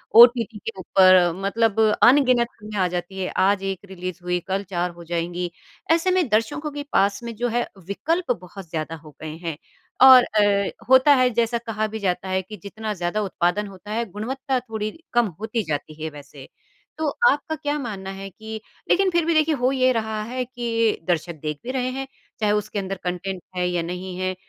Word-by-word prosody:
OTT 235 -2 +7
के 225 - -5
ऊपर 185 -1 +5
मतलब 225 +1 +1 0.2
अनगिनत 250 -2 +5
फ़िल्में 210 -1 -5
आ 180 - +3
जाती 180 +2 -5
है, 185 - -1
आज 195 +1 +3
एक 195 -1 -2
रिलीज 185 -1 -6
हुई 180 0 0
कल 195 +1 -1
4 175 -1 -1
हो 170 0 -12
जाएँगी, 175 +1 -3 0.4
ऐसे 335 +3 +3
में 365 -6 +2
दर्शकों 230 +8 0
के 290 0 -5
पास 200 +2 +2
में 230 -1 -6
जो 245 +2 -1
है 240 +1 0 0.2
विकल्प 325 - -1
बहुत 180 -1 -11
ज़्यादा 160 0 -3
हो 155 -1 -13
गए 155 0 -6
हैं, 165 -3 -5 0.4
और 260 -2 +10
अ, 205 -2 +2 0.2
होता 260 +2 +7
है 255 -1 +4
जैसा 235 0 +1
कहा 220 -2 -2
भी 220 +1 -6
जाता 190 -1 -1
है 190 0 +1
कि 210 +3 -10
जितना 215 +1 -5
ज़्यादा 180 +3 -2
उत्पादन 190 +1 0
होता 195 +2 -11
है, 230 +2 -1
गुणवत्ता 255 +5 -2
थोड़ी 220 -3 -4 0.2
कम 240 -1 +4
होती 220 +1 -2
जाती 155 0 -5
है 160 - -2
वैसे। 145 -2 -12 0.5
तो 315 -1 -1 0.2
आपका 295 +2 -1
क्या 295 -1 -2
मानना 200 -7 -5
है 195 0 -7
कि 220 +3 -8 0.3
लेकिन 385 +1 +4
फिर 340 -2 +2
भी 335 - +2
देखिए 310 0 +3
हो 255 -1 +1
ये 255 -1 +3
रहा 220 -1 -2
है 250 +3 -3
कि 230 -3 0
दर्शक 170 -1 0
देख 150 -1 -4
भी 250 - -4
रहे 255 -1 -1
हैं, 270 +1 -4 0.3
चाहे 210 -2 +2
उसके 210 0 -1
अंदर 195 0 -3
कंटेंट 180 +1 -3
है 180 0 0
या 175 -1 0
नहीं 180 +2 -5
है। 185 0 -2
210 Hz, 200 wpm, -23 LUFS, 180-240 Hz, 0.5 s, और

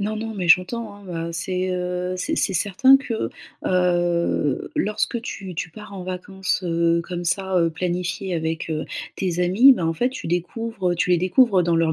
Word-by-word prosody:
Non, 210 +2 -1
non, 225 +1 -4
mais 190 -4 -3
j'entends, 200 +6 +3
hein, 175 -5 -6
heu, - - -6
c'est, 185 +2 -2
heu, 180 0 -2
c'est 310 +13 -2
c'est 195 - +1
certain 205 - +5
que, 240 -5 -3 0.4
heu, 175 -5 +1
lorsque 215 +3 0
tu 190 -7 -7
tu 160 - -3
pars 210 +4 -11
en 190 -2 -7
vacances, 185 +1 -3
heu, 170 -1 +2
comme 175 0 -5
ça, 190 +1 0
heu, 170 -1 +3
planifiées 180 +2 -2
avec, 160 0 -3
heu, 155 -1 -2 0.3
tes 180 -2 -1
amis. 195 +10 +7
Ben, 180 - -1
en - - +1
fait 245 +9 +1
tu 260 - -6
découvres, 190 +3 -2
heu - - -1
tu 180 +1 0
les 180 - +5
découvres 190 +1 +3
dans 170 0 +2
leur 165 -1 +2
180 Hz, 195 wpm, -23 LUFS, 170-200 Hz, 0.4 s, amis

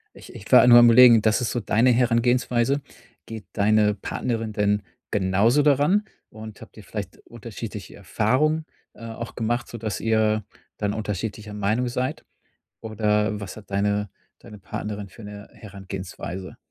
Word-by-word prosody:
Ich - - -14
ich - - -12
war - - +8
nur 120 -1 +9
am 120 - +7
Überlegen, 120 -1 +7
das 110 +3 +2
ist 125 - -1
so 120 - -1
deine 115 +4 +2
Herangehensweise. 125 +2 +1 0.4
Geht 110 -2 -9
deine 105 0 +2
Partnerin 115 +2 -4
denn 105 -1 0 0.3
genauso 100 +8 +2
da 145 -1 +5
ran 185 +10 +1 0.2
und 110 -1 -11
habt - - -14
ihr 105 - -11
vielleicht 100 -1 -7
unterschiedliche 115 -2 -9
Erfahrung, 130 - 0 0.3
äh, 115 - -12
auch 115 +1 -7
gemacht, 120 +1 -2
sodass 110 -4 -5
ihr 110 -1 +1 0.3
dann 105 -1 -2
unterschiedlicher 105 0 -5
Meinung 105 +5 -1
seid? 125 +2 -3 0.6
Oder 105 -1 0
was 100 -2 -8
hat 105 - -14
deine 100 0 -1 0.3
deine 105 -2 -13
Partnerin 105 0 -6
für 115 - -14
'ne 105 0 -10
Herangehensweise? 95 -2 -8
110 Hz, 150 wpm, -23 LUFS, 105-120 Hz, 0.6 s, nur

